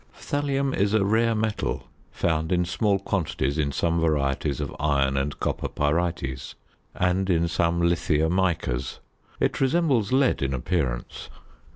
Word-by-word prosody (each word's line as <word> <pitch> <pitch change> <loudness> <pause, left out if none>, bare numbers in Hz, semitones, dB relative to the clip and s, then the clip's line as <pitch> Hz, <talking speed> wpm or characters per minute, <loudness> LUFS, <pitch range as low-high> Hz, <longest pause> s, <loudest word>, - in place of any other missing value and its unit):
Thallium 140 -1 -1
is 100 +2 +1
a 100 -3 +3
rare 115 +2 +2
metal, 110 -1 -2 0.2
found 80 -1 -1
in 90 -1 +2
small 100 +3 +1
quantities 80 -7 -1
in 70 -2 +1
some 85 +4 0
varieties 75 -3 0
of 75 -2 -4
iron 70 -2 +1
and 70 +2 -2
copper - - -2
pyrites, 75 -4 -1 0.4
and 90 +1 +1
in 85 -2 +2
some 85 0 +1
lithia 85 -2 +2
micas. 80 -8 -1 0.4
It - - 0
resembles 135 - +2
lead 130 0 +3
in 70 -1 0
appearance. 65 -3 -2
85 Hz, 140 wpm, -25 LUFS, 75-100 Hz, 0.4 s, a